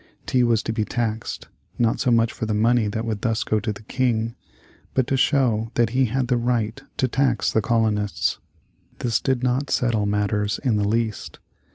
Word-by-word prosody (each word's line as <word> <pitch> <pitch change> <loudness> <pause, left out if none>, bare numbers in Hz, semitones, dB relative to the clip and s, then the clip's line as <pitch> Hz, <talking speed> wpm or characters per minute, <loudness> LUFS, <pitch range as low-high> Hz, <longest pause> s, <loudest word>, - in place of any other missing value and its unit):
Tea 125 -1 +2
was 115 -2 +2
to 110 - -2
be 110 -1 0
taxed, 115 -1 -3 0.3
not 115 -2 +1
so - - +1
much 115 -1 +3
for 110 - -4
the 110 - 0
money 115 +1 +3
that 110 +2 -3
would 110 -3 -3
thus 115 -1 0
go 110 - +1
to 110 +1 -2
the 105 +1 -9
King, 115 -1 0 0.6
but 130 - +3
to 135 - 0
show 125 -5 +2
that 120 -2 +2
he 130 +1 +3
had 125 +2 -1
the 125 0 +2
right 115 -2 -1 0.2
to 130 - +2
tax 130 -1 +1
the 110 - +3
colonists. 105 -3 0 0.6
This 120 -3 0
did 130 -2 0
not 130 +3 0
settle 115 -4 +1
matters 105 0 0
in 120 -6 +2
the 100 -1 +1
least. 110 0 -2
115 Hz, 195 wpm, -23 LUFS, 110-125 Hz, 0.6 s, much